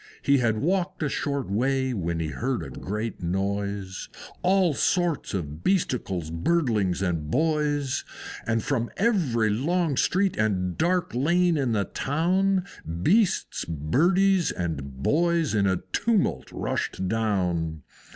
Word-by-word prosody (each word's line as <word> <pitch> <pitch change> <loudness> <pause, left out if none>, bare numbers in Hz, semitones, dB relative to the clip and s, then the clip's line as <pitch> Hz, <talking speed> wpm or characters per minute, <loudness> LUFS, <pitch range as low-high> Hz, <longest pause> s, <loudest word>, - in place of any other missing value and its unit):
He 140 -1 +4
had 110 -3 +1
walked 175 - 0
a 145 - 0
short 140 -1 -2
way, 130 +5 0
when 85 -5 -2
he 80 -1 -2
heard 125 +9 -2
a - - -8
great 105 +3 -4
noise, 100 +1 -2
Of - - -14
all 185 -3 +3
sorts 170 - 0
of 75 -3 -5
Beasticles, 100 - 0
Birdlings, 100 - +1
and 80 -4 -2
Boys; 150 - 0 0.4
And 115 -1 +1
from 120 -4 -1
every 150 - +2
long 160 - +1
street 190 0 +2
and 90 -5 0
dark 180 +1 +1
lane 170 +7 +2
in 135 -6 0
the 100 -2 +1
town 185 +6 +1 0.4
Beasts, 205 - +2
Birdies, 175 - +2
and 70 -6 -4
Boys 170 -2 +2
in 100 -2 +2
a 95 -2 0
tumult 225 -5 +1
rushed 95 - -2
down. 90 -8 -1
125 Hz, 130 wpm, -26 LUFS, -, 0.4 s, He